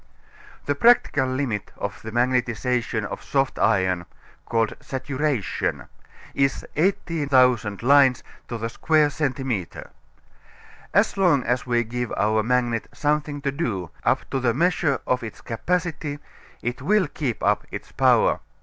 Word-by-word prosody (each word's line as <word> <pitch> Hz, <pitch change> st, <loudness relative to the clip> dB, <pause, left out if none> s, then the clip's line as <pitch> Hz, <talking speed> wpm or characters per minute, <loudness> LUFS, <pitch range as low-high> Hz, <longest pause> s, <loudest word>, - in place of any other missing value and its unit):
The 145 Hz, -, +1 dB
practical 145 Hz, -, +4 dB
limit 130 Hz, -6 st, -2 dB
of 100 Hz, 0 st, -5 dB
the 110 Hz, -, -7 dB
magnetization 120 Hz, -2 st, 0 dB
of -, -, -6 dB
soft 135 Hz, -1 st, 0 dB
iron 90 Hz, -3 st, +2 dB, 0.4 s
(called 115 Hz, -1 st, 0 dB
saturation) 135 Hz, -, -2 dB, 0.5 s
is 135 Hz, -1 st, 0 dB
18,000 135 Hz, -, +2 dB
lines 135 Hz, -1 st, +5 dB, 0.2 s
to 120 Hz, -, -4 dB
the 115 Hz, +1 st, -3 dB
square 150 Hz, +5 st, +2 dB
centimeter. 130 Hz, -, -3 dB, 1.0 s
As 205 Hz, +2 st, +2 dB
long 170 Hz, -9 st, +3 dB
as 125 Hz, +2 st, -1 dB
we 120 Hz, -1 st, +2 dB
give 120 Hz, +1 st, -4 dB
our 110 Hz, +1 st, +2 dB
magnet 120 Hz, 0 st, 0 dB
something 150 Hz, -1 st, -1 dB
to 140 Hz, -, -1 dB
do, 110 Hz, -, -3 dB
up -, -, +1 dB
to 135 Hz, -, 0 dB
the 120 Hz, -3 st, +1 dB
measure 160 Hz, -3 st, +1 dB
of 125 Hz, 0 st, 0 dB
its 115 Hz, -2 st, -8 dB
capacity, 160 Hz, +3 st, -2 dB, 0.5 s
it 120 Hz, +1 st, -3 dB
will 210 Hz, -3 st, +2 dB
keep 140 Hz, -5 st, -4 dB
up -, -, +1 dB
its -, -, -8 dB
power. -, -, +3 dB
130 Hz, 130 wpm, -24 LUFS, 115-145 Hz, 1.0 s, lines